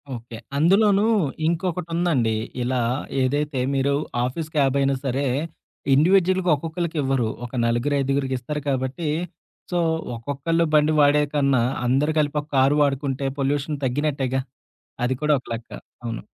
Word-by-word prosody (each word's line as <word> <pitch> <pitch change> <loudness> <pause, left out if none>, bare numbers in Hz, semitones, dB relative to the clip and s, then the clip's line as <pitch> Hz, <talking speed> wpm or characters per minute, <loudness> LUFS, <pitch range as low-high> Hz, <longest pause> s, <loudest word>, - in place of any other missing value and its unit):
Okay. 115 -1 -9 0.2
అందులోనూ 200 +6 +4 0.4
ఇంకొకటుందండి. 170 - 0 0.3
ఇలా 125 0 0 0.4
ఏదైతే 145 +1 0 0.2
మీరు 135 +1 +1 0.3
ఆఫీస్ 155 +5 -4
క్యాబ్ 140 -2 +3
అయినా 135 0 +2
సరే 135 +2 0 0.7
ఇండివిడ్యువల్‌గా 185 +4 +3
ఒక్కొక్కళ్ళకి 165 +2 -4
ఇవ్వరు. 135 -4 +1 0.2
ఒక 120 - -9
నలుగురు, 120 +5 +1
ఐదుగురికి 135 -1 0
ఇస్తారు 150 +5 -4
కాబట్టి, 135 +4 -2 0.6
సో, 175 - +1 0.4
ఒక్కొక్కళ్ళు 145 +7 -1
బండి 150 +1 +4
వాడేకన్నా, 145 -3 +3 0.2
అందరూ 140 +5 +2
కలిపి 150 0 +1
ఒక 145 - -17
కారు 135 +3 +4
వాడుకుంటే, 135 -1 -1
పొల్యూషన్ 145 +1 -1
తగ్గినట్టేగా. 135 -1 0 0.6
అది 125 - +1
కూడా 150 0 +4
ఒక - - -21
లెక్క. 115 0 -7 0.4
అవును. 115 -1 -4
140 Hz, 125 wpm, -23 LUFS, 130-155 Hz, 0.7 s, అందులోనూ